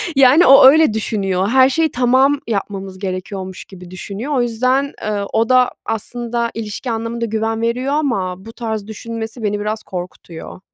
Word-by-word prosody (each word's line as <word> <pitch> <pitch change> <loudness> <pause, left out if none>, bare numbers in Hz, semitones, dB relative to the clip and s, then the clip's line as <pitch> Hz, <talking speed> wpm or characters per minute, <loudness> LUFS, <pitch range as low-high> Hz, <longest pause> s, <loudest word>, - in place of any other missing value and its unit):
Yani, 275 +5 +6
o, 270 0 +8
öyle 310 -4 +5
düşünüyor, 195 -3 -1
her 260 +1 +5
şeyi 320 +3 +1
tamam 260 +3 +3
yapmamız 195 -3 -4
gerekiyormuş 190 0 -6
gibi 180 -2 -13
düşünüyor. 205 +9 -6
O 250 - +2
yüzden, 255 +4 0
ııı, 205 -1 -2
o 225 +2 +1
da 255 -1 +4
aslında 235 +1 -3
ilişki 225 +2 -5
anlamında 230 +1 -3
güven 225 +1 -2
veriyor 250 +4 -1
ama 195 -10 -2
bu 225 - -10
tarz 220 -3 -4
düşünmesi 225 +1 -7
beni 205 0 -1
biraz 215 +1 -3
korkutuyor. 180 -2 -8
225 Hz, 155 wpm, -18 LUFS, 200-255 Hz, -, o